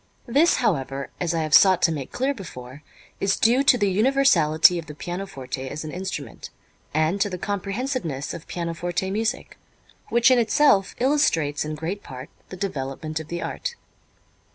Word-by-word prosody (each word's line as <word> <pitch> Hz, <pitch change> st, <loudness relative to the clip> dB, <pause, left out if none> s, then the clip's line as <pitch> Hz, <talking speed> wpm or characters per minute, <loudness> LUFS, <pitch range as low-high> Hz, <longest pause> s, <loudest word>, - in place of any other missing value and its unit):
This, 290 Hz, +8 st, +3 dB
however, 140 Hz, -, -1 dB
as 170 Hz, -1 st, -1 dB
I 165 Hz, -, 0 dB
have 155 Hz, -1 st, -4 dB
sought 185 Hz, -2 st, +6 dB
to 165 Hz, -, +5 dB
make 145 Hz, -5 st, -5 dB
clear 270 Hz, +3 st, 0 dB
before, 140 Hz, -, -10 dB, 0.4 s
is 195 Hz, -1 st, +1 dB
due 240 Hz, +4 st, +3 dB
to 250 Hz, -, +6 dB
the 205 Hz, -4 st, +1 dB
universality 190 Hz, -, +4 dB
of 160 Hz, -, -9 dB
the 150 Hz, -, -9 dB
pianoforte 140 Hz, -8 st, -6 dB
as 150 Hz, +4 st, -6 dB
an 155 Hz, -, -6 dB
instrument 175 Hz, -, -6 dB, 0.4 s
and 155 Hz, +6 st, 0 dB
to 205 Hz, -, +2 dB
the 180 Hz, -, -5 dB
comprehensiveness 200 Hz, -, -3 dB
of 165 Hz, -, -9 dB
pianoforte 175 Hz, +2 st, -3 dB
music, 220 Hz, +4 st, -3 dB, 0.5 s
which 235 Hz, +2 st, +4 dB
in 255 Hz, -, +5 dB
itself 225 Hz, -4 st, +3 dB
illustrates 240 Hz, -, +1 dB
in 155 Hz, 0 st, -4 dB
great 170 Hz, +6 st, -4 dB
part 130 Hz, -6 st, -10 dB, 0.2 s
the 185 Hz, -, -8 dB
development 155 Hz, -3 st, -4 dB
of 160 Hz, -, -8 dB
the 170 Hz, +1 st, -4 dB
art. -, -, -4 dB
180 Hz, 165 wpm, -24 LUFS, 155-220 Hz, 0.5 s, sought